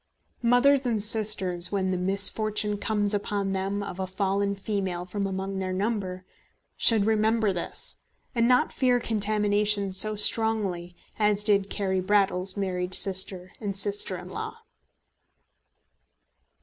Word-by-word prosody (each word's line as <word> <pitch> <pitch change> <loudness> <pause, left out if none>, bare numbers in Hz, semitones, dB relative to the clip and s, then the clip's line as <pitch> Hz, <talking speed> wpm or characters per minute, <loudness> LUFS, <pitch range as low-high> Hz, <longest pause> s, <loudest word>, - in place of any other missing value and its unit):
Mothers 250 +3 +3
and 220 -4 0
sisters, 205 -5 +3
when 190 -2 -1
the - - -1
misfortune 205 +3 +2
comes 205 -1 0
upon 205 -1 -3
them 195 +1 -3
of 190 -2 -8
a 190 - -3
fallen 200 +1 -2
female 190 -3 -4
from 200 +2 -4
among 190 0 -5
their 185 -1 -4
number, 190 -2 -3 0.5
should 220 -3 +5
remember 220 -1 +1
this, 175 - -3 0.4
and 235 -2 +1
not 250 0 +2
fear 250 -2 +1
contamination 210 -2 0
so 215 +3 +4
strongly 205 -5 0 0.2
as 210 -1 +1
did 200 -2 +1
Carry 190 -2 -2
Brattle's 190 0 0
married 185 -2 -2
sister 185 -1 +2
and 200 -3 -4
sister 200 -1 +1
in 180 - -11
law. 185 - -8
200 Hz, 130 wpm, -25 LUFS, 190-215 Hz, 0.5 s, should